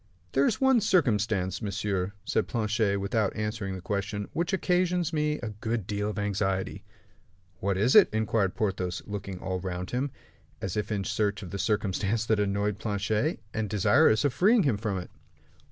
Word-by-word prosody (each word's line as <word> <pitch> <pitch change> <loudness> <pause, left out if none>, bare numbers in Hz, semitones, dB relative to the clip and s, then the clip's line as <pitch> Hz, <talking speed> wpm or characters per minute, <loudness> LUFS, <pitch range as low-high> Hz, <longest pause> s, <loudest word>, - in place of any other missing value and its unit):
"There 135 +1 +3
is - - 0
one 265 -3 +4
circumstance, 105 - +1
monsieur," 100 -2 -2
said - - 0
Planchet, 110 -3 0
without 100 +1 0
answering 105 -3 -3
the 90 - -8
question, 100 0 -2
"which 170 +2 -1
occasions 180 -3 +1
me 150 -1 +1
a 110 - -2
good 110 -1 -3
deal 105 +1 -2
of 105 - -5
anxiety." 95 -2 -1 0.8
"What 95 0 0
is 115 +6 +3
it?" - - +8
inquired 110 -3 0
Porthos, 95 -4 -2
looking 100 -2 -5
all 95 0 -3
round 90 0 -4
him 130 +3 -1 0.5
as 95 - -4
if 105 0 -2
in 100 -2 -1
search 105 +1 -1
of 90 - -8
the 100 - -4
circumstance 105 +1 0
that 110 -2 +2
annoyed 100 0 0
Planchet, 110 - -1
and 110 -2 -2
desirous 110 - +4
of 140 - +2
freeing 210 - +4
him 130 -9 +2
from 105 -2 -2
it. 90 - -7
105 Hz, 170 wpm, -28 LUFS, 100-115 Hz, 0.8 s, it